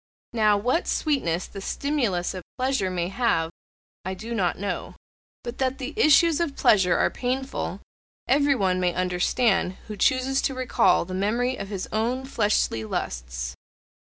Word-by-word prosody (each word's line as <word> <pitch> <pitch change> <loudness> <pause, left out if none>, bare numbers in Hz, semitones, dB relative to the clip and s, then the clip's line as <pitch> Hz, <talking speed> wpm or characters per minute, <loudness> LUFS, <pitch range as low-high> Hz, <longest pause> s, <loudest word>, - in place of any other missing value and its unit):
Now, 215 -3 +4
what 245 - 0
sweetness 185 - 0
the 195 - -9
stimulus 230 -9 -1
of 185 - -6 0.2
pleasure 255 -7 0
may 175 -1 -2
have 195 -7 +1 0.5
I 190 +1 -3
do 225 +5 -6
not 185 -6 0
know. 200 +1 -4 0.5
But 240 +1 -6
that 260 0 0
the 270 +2 -5
issues 330 -4 +5
of 325 -5 -1
pleasure 190 -4 +4
are - - +2
painful 260 +2 -3 0.5
everyone 260 -10 +2
may 180 -1 0
understand 185 +2 +1
who 215 - -6
chooses 260 +5 +2
to 270 - -1
recall 245 -9 +2
the 185 - -7
memory 230 +7 0
of 200 - -6
his 195 -2 -4
own 240 +4 -1
fleshly 210 - +1
lusts. - - -4
215 Hz, 150 wpm, -25 LUFS, 185-260 Hz, 0.5 s, issues